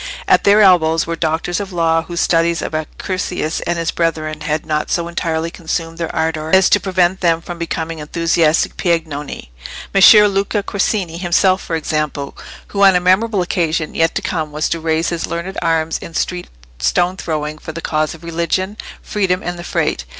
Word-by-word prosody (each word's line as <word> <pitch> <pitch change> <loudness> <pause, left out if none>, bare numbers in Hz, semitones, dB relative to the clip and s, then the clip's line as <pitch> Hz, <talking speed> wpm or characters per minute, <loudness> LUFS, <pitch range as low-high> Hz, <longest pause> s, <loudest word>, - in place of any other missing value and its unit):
At - - +4
their 205 +1 +6
elbows 165 -4 +4
were 165 - -3
doctors 165 +2 -1
of 200 -1 -5
law 165 -2 +2
whose 170 +1 -5
studies 170 0 +2
of - - -4
Accursius 165 +1 -3
and 175 0 0
his 165 0 -1
brethren 155 -2 -2
had 155 0 -2
not 150 -1 -1
so 170 -1 0
entirely 165 -1 -2
consumed 165 -1 -4
their 165 - -2
ardour 160 -1 -1
as 190 0 +4
to - - +5
prevent 185 -1 +1
them 165 -2 +2
from 170 0 -8
becoming 165 -1 -4
enthusiastic 165 +1 +1
Piagnoni: 155 - -2 0.4
Messer 210 +2 +8
Luca 200 +1 -1
Corsini 195 -4 -1
himself, 185 +1 +2
for 165 - -3
example, 150 -3 -2 0.3
who 200 - -2
on 195 -1 +7
a - - +4
memorable 190 +2 +2
occasion 165 -3 -1
yet 165 +1 +1
to - - -2
come 155 -3 -2
was 150 +1 -1
to 165 - -1
raise 160 +1 0
his 170 -1 -3
learned 170 +3 -4
arms 165 -1 0
in 165 - -10
street 180 -1 -2 0.3
stone 175 - +1
throwing 155 -3 -4
for 160 - -7
the 165 - -7
cause 155 -1 -1
of 165 - -16
religion, 170 +4 -2 0.3
freedom, 190 -3 -1
and 175 0 -4
the - - -6
Frate. - - -1
170 Hz, 185 wpm, -17 LUFS, 160-180 Hz, 0.4 s, Messer